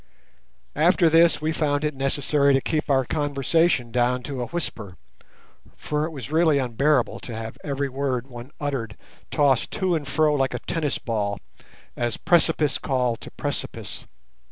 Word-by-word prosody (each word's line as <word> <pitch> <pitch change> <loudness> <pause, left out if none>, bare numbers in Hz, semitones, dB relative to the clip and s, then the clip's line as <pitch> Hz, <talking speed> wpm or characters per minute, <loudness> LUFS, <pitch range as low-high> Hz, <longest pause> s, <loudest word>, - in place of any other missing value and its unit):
After 170 +3 +4
this 165 0 +5
we 155 +1 0
found 145 -2 0
it 150 0 0
necessary 140 +1 +2
to - - +4
keep 155 +1 -2
our 135 -2 +3
conversation 145 -2 +1
down 125 +1 +1
to 135 -2 -4
a 120 - -3
whisper—for 150 - -6
it - - -4
was 140 -4 -8
really 160 -2 +4
unbearable 130 +1 +1
to 115 - -7
have 110 0 -6
every 140 -1 -2
word 130 -2 -2
one 120 -1 -10
uttered 135 -7 -3 0.3
tossed 140 -5 +2
to 185 -2 0
and 155 -4 -2
fro 155 0 +2
like 135 -3 0
a - - -3
tennis 155 -4 -1
ball, 105 -4 -2 0.6
as 120 -2 -2
precipice 155 -4 +2
called 125 -4 -1
to - - -9
precipice. - - -5
140 Hz, 155 wpm, -24 LUFS, 125-155 Hz, 0.6 s, this